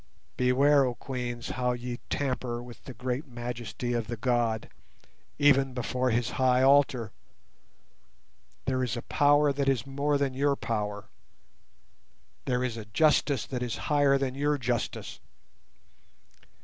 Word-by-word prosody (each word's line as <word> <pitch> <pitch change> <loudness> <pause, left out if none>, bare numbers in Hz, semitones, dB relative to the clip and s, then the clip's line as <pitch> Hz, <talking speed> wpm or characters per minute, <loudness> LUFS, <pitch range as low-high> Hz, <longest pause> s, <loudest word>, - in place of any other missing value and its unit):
Beware, 135 +3 +4
oh 125 -2 -1
Queens, 120 -2 -5
how 125 -1 0
ye 120 0 -5
tamper 125 -3 -2
with 120 -1 -13
the 130 - -8
great 125 +3 -3
majesty 120 0 -5
of 115 -2 -1
the 120 0 -4
God, 115 -1 0 0.7
even 135 -3 +4
before 125 +1 -1
His 120 0 0
high 130 0 +4
altar! 135 -5 +4 1.5
There 130 -1 0
is 120 -1 -2
a 120 - -5
Power 145 0 +3
that 140 0 0
is 130 -5 0
more 140 +2 0
than 140 -2 0
your 140 +2 +1
power; 105 -5 -3 1.4
there 125 -1 0
is 120 -3 -2
a 110 - -7
Justice 140 +1 +2
that 125 -2 -4
is 120 -2 -3
higher 145 -2 +4
than 135 -2 -2
your 145 +2 0
justice. 120 -2 -3
125 Hz, 135 wpm, -28 LUFS, 120-140 Hz, 1.5 s, Beware